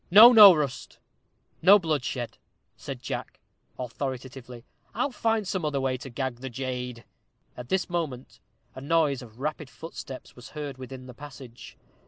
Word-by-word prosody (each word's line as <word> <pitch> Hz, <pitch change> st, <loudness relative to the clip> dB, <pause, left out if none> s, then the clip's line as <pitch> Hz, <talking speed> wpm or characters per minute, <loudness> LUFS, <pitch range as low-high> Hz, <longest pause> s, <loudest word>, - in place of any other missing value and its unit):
"No, 215 Hz, +7 st, +10 dB
no, 210 Hz, -4 st, +11 dB
Rust; 145 Hz, -4 st, -3 dB, 0.6 s
no 200 Hz, +2 st, +8 dB
bloodshed," 145 Hz, -, -3 dB, 0.4 s
said -, -, -8 dB
Jack, -, -, -5 dB, 0.4 s
authoritatively; 125 Hz, -1 st, -6 dB, 0.3 s
"I'll 250 Hz, +5 st, 0 dB
find 225 Hz, -4 st, 0 dB
some 185 Hz, -3 st, -2 dB
other 145 Hz, -2 st, 0 dB
way 130 Hz, -1 st, 0 dB
to 135 Hz, -, -9 dB
gag 130 Hz, 0 st, -3 dB
the 130 Hz, +2 st, -7 dB
jade." 125 Hz, -1 st, -5 dB, 0.5 s
At 125 Hz, 0 st, -9 dB
this 190 Hz, -1 st, 0 dB
moment 135 Hz, -9 st, -4 dB, 0.3 s
a 130 Hz, -, -9 dB
noise 145 Hz, -2 st, +1 dB
of 115 Hz, -1 st, -14 dB
rapid 150 Hz, 0 st, -4 dB
footsteps 155 Hz, -4 st, -9 dB
was 125 Hz, -, -12 dB
heard 145 Hz, -3 st, -5 dB
within 130 Hz, 0 st, -9 dB
the 125 Hz, -, -10 dB
passage. 130 Hz, -3 st, -12 dB
135 Hz, 150 wpm, -27 LUFS, 125-160 Hz, 0.6 s, no